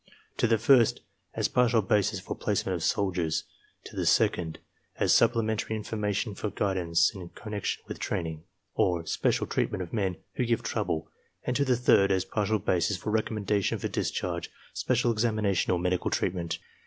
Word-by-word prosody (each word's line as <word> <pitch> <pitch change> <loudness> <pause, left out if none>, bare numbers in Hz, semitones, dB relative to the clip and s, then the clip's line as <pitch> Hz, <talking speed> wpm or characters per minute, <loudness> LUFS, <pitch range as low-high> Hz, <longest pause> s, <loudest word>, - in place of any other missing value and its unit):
To - - +3
the 115 0 +3
first, 115 +1 +4 0.3
as - - +1
partial 120 -3 +3
basis 100 +1 +1
for - - -5
placement - - -1
of - - -4
soldiers; 90 -5 0 0.4
to - - -11
the - - -1
second, 80 -3 +2 0.4
as - - +3
supple 115 -1 +4
mentary 110 0 -1
information 105 0 -2
for 105 - -3
guidance 90 -4 +1
in 90 -3 -8
connection 105 -1 -4
with - - -6
training, 80 -2 -3 0.3
or 85 -2 +1
special - - +1
treatment 95 - -1
of 85 - -11
men 95 -5 0 0.2
who 125 - +1
give 115 -1 0
trouble; 80 0 -2 0.3
and 125 - -1
to 140 - +3
the 130 -3 +2
third, 100 -5 +4
as 95 -1 +1
partial 110 0 0
basis 90 -3 +1
for 95 +4 -4
reconamendation 105 -2 0
for - - -2
discharge, 85 -2 -2 0.2
special 125 -1 +1
examination, 110 -5 +1
or 90 - +2
medical 90 +1 0
treatment. 85 -2 -1
100 Hz, 165 wpm, -28 LUFS, 90-110 Hz, 0.4 s, first